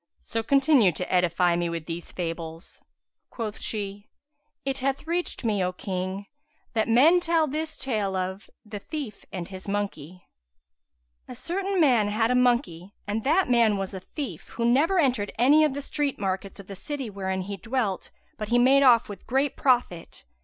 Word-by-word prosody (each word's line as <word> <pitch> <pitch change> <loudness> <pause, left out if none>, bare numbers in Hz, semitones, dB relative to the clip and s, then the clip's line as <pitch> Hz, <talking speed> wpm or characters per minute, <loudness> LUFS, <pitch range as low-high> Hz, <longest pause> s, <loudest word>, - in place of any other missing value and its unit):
So 225 - -3
continue 275 - +4
to 180 +3 -4
edify 180 -1 +3
me 170 0 -1
with 165 -2 -4
these 170 +1 -6
fables." 165 -1 -6 0.5
Quoth 220 -3 -5
she:—It 225 +7 -7
hath 270 +2 -1
reached 340 -5 -2
me, 205 -4 +1
O 180 - 0
King, 185 +1 -4 0.5
that 220 -2 +1
men 285 +10 +6
tell 335 -2 +2
this 310 +2 -4
tale 215 -7 -1
of 190 +2 -4 0.2
THE 210 -1 -7
THIEF 280 -4 -7
AND 180 -4 -5
HIS 190 0 -9
MONKEY[FN#171] 185 -4 -4 1.1
A - - -8
certain 385 +3 -2
man 245 -9 +4
had 225 +3 +1
a - - +3
monkey 240 - +1
and 210 +2 -2
that 330 +7 +3
man 230 -4 +3
was 195 0 -4
a 190 - -5
thief, 275 - -7
who 235 - -1
never 290 +11 +3
entered 250 - +1
any 285 +7 +5
of 300 -3 +1
the 285 - -4
street 290 -1 -1
markets 195 0 -3
of 200 - -10
the 195 - -8
city 270 +1 -5
wherein 190 -1 -3
he 200 +2 -5
dwelt, 225 -4 -2 0.3
but 215 -1 -4
he 240 - +3
made 265 +3 +5
off 240 -4 +6
with 205 - -10
great 270 +3 +1
profit. 245 -10 0
220 Hz, 175 wpm, -26 LUFS, 190-275 Hz, 1.1 s, men